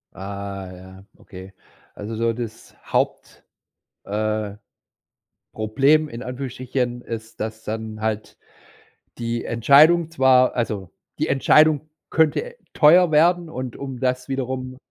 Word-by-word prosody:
Ah 100 -1 -6
ja, 95 +1 -13
okay. 95 +1 -12 0.4
Also 105 +2 -6
so 115 +1 0
das 115 -1 -8
Haupt - - -2 0.6
äh, 105 0 -2 1.0
Problem, 140 +8 +2
in 120 -2 -8
Anführungsstrichen, 125 -1 -4
ist, 115 -1 -8
dass 110 0 -5
dann 110 0 -5
halt 110 -1 -3 0.8
die 115 0 -3
Entscheidung 155 +8 +5
zwar 130 -4 +4
also, 105 -7 -3 0.3
die - - 0
Entscheidung 150 +2 +4 0.2
könnte 165 - +1 0.2
teuer 170 +3 +6
werden 170 +2 +3
und 130 -4 -6
um 135 -3 -6
das 125 -1 -1
wiederum 130 -1 -4
120 Hz, 115 wpm, -22 LUFS, 110-140 Hz, 1.0 s, teuer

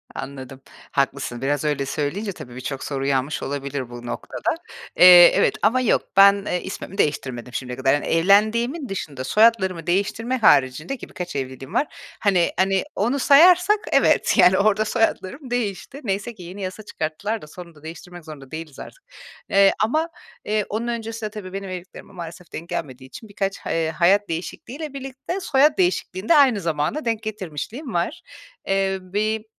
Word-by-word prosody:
Anladım. 135 -1 -8 0.3
Haklısın. 130 -3 -1
Biraz 145 +1 0
öyle 145 -2 0
söyleyince 165 +10 -3
tabii, 125 -8 -11
birçok 130 +1 -5
soru 135 -2 -3
uyanmış 135 +1 -1
olabilir 140 -2 -4
bu 120 0 -9
noktada. 120 - -3 0.4
Eee, 180 -1 +9
evet. - - +2
Ama 235 +5 +3
yok, 250 - +2 0.2
ben, 200 0 +6
eee, 180 - -2
ismimi 195 +1 -7
değiştirmedim 125 - -2
şimdiye 125 -1 -5
kadar. 135 0 +2
Yani, 145 - -1
evlendiğimin 215 - +2
dışında, 150 -9 -5
soyadlarımı 190 - +2
değiştirme 210 +7 0
haricinde, 155 - +3
ki - - -11
birkaç 180 -6 -7
evliliğim 130 0 -6
var, 295 - +1 0.3
hani 185 -5 +2
hani, 190 0 +2
onu 245 +7 0
sayarsak 360 +9 +6
evet, - - +3
yani, 180 +1 +6
orada 215 +1 +2
soyadlarım 235 +3 -1
değişti. 245 +3 -3
Neyse 200 +2 -3
ki 185 - -11
yeni 185 +4 -9
yasa 190 +3 -6
çıkarttılar 200 +6 -4
da 150 - -11
sonunda 170 -2 -13
değiştirmek 170 +1 -10
zorunda 140 -4 -11
değiliz 160 -3 -8
artık. - - -11 0.5
Eee 195 0 +5
ama, 310 +9 0 0.4
eee, 210 -1 0
onun 225 +3 -3
öncesinde 225 -2 -4
tabii 205 -3 -9
benim 195 -1 -5
evliliklerime 185 +2 -9
maalesef 170 -1 -10
denk 170 +2 -7
gelmediği 130 -3 -5
için 215 - -12
birkaç 195 -1 -3
he 160 -1 -1
hayat 195 +5 +3
değişikliğiyle 265 - -6
birlikte, 270 +7 -5
soyad 295 -2 +3
değişikliğini 285 - -1
de 335 - +7
aynı 260 -9 +5
zamana 165 - -2
denk 225 -1 -1
getirmişliğim 215 - -6
var. 175 - -2 0.5
Eee, 195 0 +1
bir 210 +4 -2
190 Hz, 160 wpm, -22 LUFS, 150-225 Hz, 0.5 s, Eee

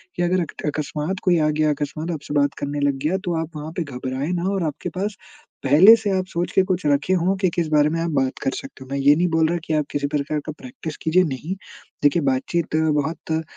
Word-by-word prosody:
कि 175 - 0
अगर 180 +1 +2 0.3
अकस्मात 150 +4 -2
कोई 175 -2 +4
आ 155 -1 +2
गया, 155 0 +2
अकस्मात 155 +3 -3
आपसे 150 -2 -5
बात 145 0 +3
करने 145 +1 -3
लग 140 -1 +2
गया 165 +5 +1
तो 175 -2 0
आप 165 0 -6
वहाँ 155 +2 -6
पे 170 - 0
घबराए 130 0 -4
ना 180 +2 -1
और 195 -3 -1
आपके 155 +2 -3
पास 205 +1 -2 0.5
पहले 160 +12 +8
से 215 -2 -2
आप 185 -1 0
सोच 175 -1 -2
के 190 - +4
कुछ 185 -4 -1
रखे 145 +6 +2
हो 185 +2 +2
कि 185 - +3
किस 170 -2 0
बारे 150 0 +4
में 165 +1 -1
आप 170 - -1
बात 135 -2 0
कर 135 - +1
सकते 275 - -8
हो। - - -15
मैं 140 - -1
ये 145 +2 +6
नहीं 175 +3 +2
बोल 160 -1 +3
रहा 175 - 0
कि 160 - -2
आप 150 -2 +1
किसी 145 0 -1
प्रकार 150 +1 -1
का 155 - -4
प्रैक्टिस 245 - -8
कीजिए, 180 +3 +4
नहीं। 155 +4 -3 0.5
देखिए 145 +3 +4
बातचीत 145 +5 0
बहुत 155 0 0
अ, 160 0 0
155 Hz, 245 wpm, -22 LUFS, 145-175 Hz, 0.5 s, पहले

